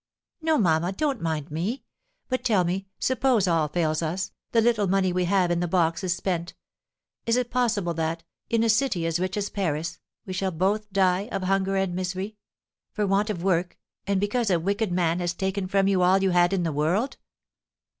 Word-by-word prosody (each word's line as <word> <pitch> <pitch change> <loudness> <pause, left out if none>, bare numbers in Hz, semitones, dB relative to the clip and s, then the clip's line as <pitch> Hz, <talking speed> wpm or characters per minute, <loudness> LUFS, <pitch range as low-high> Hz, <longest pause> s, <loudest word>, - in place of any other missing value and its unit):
"No, 320 -1 +2
mamma, 170 - +2
don't 275 +3 -1
mind 155 -2 -2
me; 205 - -3 0.4
but 255 0 -2
tell 205 -6 +3
me, 185 +3 -2
suppose 255 -6 +2
all 165 -3 +2
fails 155 0 0
us, 175 +4 -2 0.2
the 230 - +3
little 225 -3 +2
money 190 -1 +2
we 180 0 +1
have 180 -1 +2
in 170 - +1
the 175 - 0
box 165 -2 +1
is 185 -1 +1
spent, 175 -3 -3 0.7
is 230 +1 +3
it 245 -1 -1
possible 215 -8 +1
that, 165 +1 -2 0.3
in 230 -1 +2
a - - +2
city 220 -7 +2
as 165 +1 0
rich 185 +2 -2
as 205 0 -2
Paris, 165 -4 -2 0.3
we 185 - -5
shall 190 +1 -1
both 200 +5 -1
die 190 +2 +2
of 195 - -2
hunger 195 +1 +1
and 190 -2 0
misery 185 +3 -3 0.6
for 210 -2 -1
want 200 +2 +1
of 180 -5 -3
work, 180 -2 0 0.3
and 200 -1 +1
because 215 +3 0
a 175 -3 +3
wicked 200 +3 -1
man 175 -1 +1
has 175 0 -1
taken 190 0 -2
from 195 +1 +2
you 195 -2 +2
all 180 +2 +5
you 190 - +3
had 175 0 +4
in 190 -3 0
the 165 -2 -1
world?" 175 - 0
190 Hz, 200 wpm, -25 LUFS, 175-205 Hz, 0.7 s, all